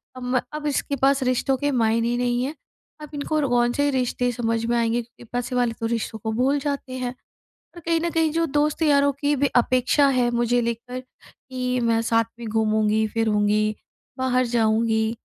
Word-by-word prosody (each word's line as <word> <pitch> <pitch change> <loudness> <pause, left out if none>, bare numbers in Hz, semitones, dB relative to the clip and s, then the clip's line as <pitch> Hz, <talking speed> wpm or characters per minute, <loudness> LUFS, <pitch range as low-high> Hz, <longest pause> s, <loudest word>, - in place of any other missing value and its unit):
अब 255 - -8
म 250 - +3 0.3
इसके 280 0 -1
पास 270 0 +3
रिश्तों 255 +1 +1
के 285 +2 0
मायने 230 -2 +1
ही 240 0 0
नहीं 245 0 0
है। 290 +4 -3 0.5
अब 300 - -8
इनको 295 +2 -1
रो 280 -4 0
कौन 240 0 +2
से 285 0 +1
रिश्ते 250 -1 0
समझ 230 -1 -1
में 240 +1 +1
आएँगे? 235 +1 +1
क्योंकि 235 +1 -16
पैसे 245 +1 -2
वाले 245 -2 +1
तो 230 - -2
रिश्तों 225 -1 -2
को 220 - -1
भूल 265 +5 +1
जाते 280 -2 -4
हैं। 250 -1 -3 0.6
पर 345 - -9
कहीं 330 +1 +1
न 340 - 0
कहीं 325 -2 +2
जो 330 +1 +1
दोस्त-यारों 290 -1 +2
की 290 0 +1
भी 280 +1 +2
अपेक्षा 255 +3 +3
है 250 -3 +2
मुझे 240 0 +1
लेकर 235 +2 -4
कि 255 0 -6
मैं 230 -1 +2
साथ 230 0 +2
में 235 - -6
घूमूँगी, 220 0 +1
फिरूँगी, 215 -1 +1 0.4
बाहर 255 -1 +1
जाऊँगी 220 -1 +1
245 Hz, 190 wpm, -23 LUFS, 230-275 Hz, 0.6 s, म